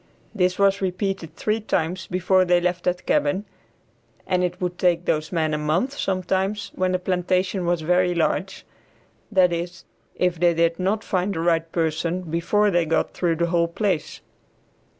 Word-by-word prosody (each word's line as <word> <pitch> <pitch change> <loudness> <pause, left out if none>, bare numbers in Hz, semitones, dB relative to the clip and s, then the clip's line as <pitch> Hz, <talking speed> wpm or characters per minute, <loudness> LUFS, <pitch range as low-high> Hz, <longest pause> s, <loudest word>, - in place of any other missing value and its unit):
This 185 -3 +1
was 200 0 +3
repeated 185 -3 -2
three 215 +1 -1
times 185 -3 -2
before 185 +1 +2
they 175 -1 +3
left 175 0 -1
that 180 0 -1
cabin, 185 +8 +1 0.8
and 180 -1 +1
it 180 0 -2
would 180 -1 -3
take 175 -1 +2
those 155 0 -1
men 160 -3 0
a 150 - -1
month 170 - 0
sometimes 190 0 -1
when 185 0 0
the - - +3
plantation 185 0 0
was 175 -1 +1
very 180 +2 +2
large, 180 +3 -1 0.7
that 185 -3 +4
is 175 +2 -5 0.3
if 180 -2 0
they 175 -1 +3
did 165 +1 +1
not 200 +4 0
find 190 +1 -1
the - - -2
right 165 -1 +1
person 165 +2 -1
before 180 +5 +1
they 175 -2 +2
got 165 - 0
through 170 -2 0
the 170 +1 +1
whole 170 -1 +3
place. 180 -1 -2
180 Hz, 170 wpm, -23 LUFS, 170-185 Hz, 0.8 s, that